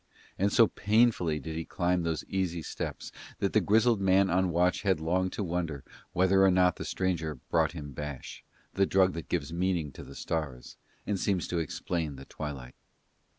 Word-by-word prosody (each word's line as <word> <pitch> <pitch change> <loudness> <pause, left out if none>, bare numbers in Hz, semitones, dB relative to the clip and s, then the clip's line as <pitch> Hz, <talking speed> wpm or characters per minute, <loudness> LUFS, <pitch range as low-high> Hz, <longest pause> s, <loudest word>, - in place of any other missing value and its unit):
And 100 +2 +2
so 115 - +6
painfully 105 -8 +2
did 80 +2 -6
he 80 - -2
climb 90 +2 0
those 80 -2 -2
easy 90 -4 -2
steps - - -5 0.3
that - - -1
the - - +4
grizzled 110 0 +3
man 95 0 +4
on 90 +1 +2
watch 90 +2 +2
had 95 -4 +1
long 90 +4 0
to 100 - -4
wonder 85 -6 -3 0.3
whether 95 +1 +4
or 95 - +6
not 90 -1 +3
the - - -5
stranger 85 -5 -1
brought 80 +5 0
him 75 -4 -7
bash, 75 -1 -7 0.3
the 95 0 +2
drug 95 -1 +3
that 85 - -7
gives 80 -4 -1
a - - -6
meaning 85 -4 0
to - - -10
the - - -12
stars 70 -7 -4 0.3
and 100 -2 -1
seems 95 -3 0
to 85 - 0
explain 80 -1 -3
the 70 +1 -10
twilight. 70 -5 -7
90 Hz, 190 wpm, -29 LUFS, 80-95 Hz, 0.3 s, so